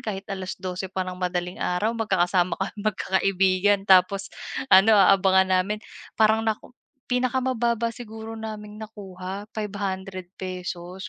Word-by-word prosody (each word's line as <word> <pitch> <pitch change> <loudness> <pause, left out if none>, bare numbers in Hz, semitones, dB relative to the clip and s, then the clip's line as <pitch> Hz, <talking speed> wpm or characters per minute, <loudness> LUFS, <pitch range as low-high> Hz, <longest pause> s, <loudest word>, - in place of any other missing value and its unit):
kahit 195 -2 -5
12:00 185 0 -5
pa 185 0 -2
ng 180 0 -6
madaling 180 0 -2
araw, 205 +6 0
magkakasama 185 -5 +1
kaming 205 +2 -4
magkakaibigan 195 +1 +2
tapos 190 +1 +4 0.4
ano, 205 +3 +8
aabangan 190 -1 +5
namin. 210 +3 -2 0.4
Parang 220 0 +4
naku 220 +2 -3 0.4
pinakamababa 245 -2 +1
siguro 225 -1 -8
naming 215 -1 -7
nakuha 195 -2 -7
₱500 190 -3 -5
195 Hz, 110 wpm, -25 LUFS, 185-215 Hz, 0.4 s, ano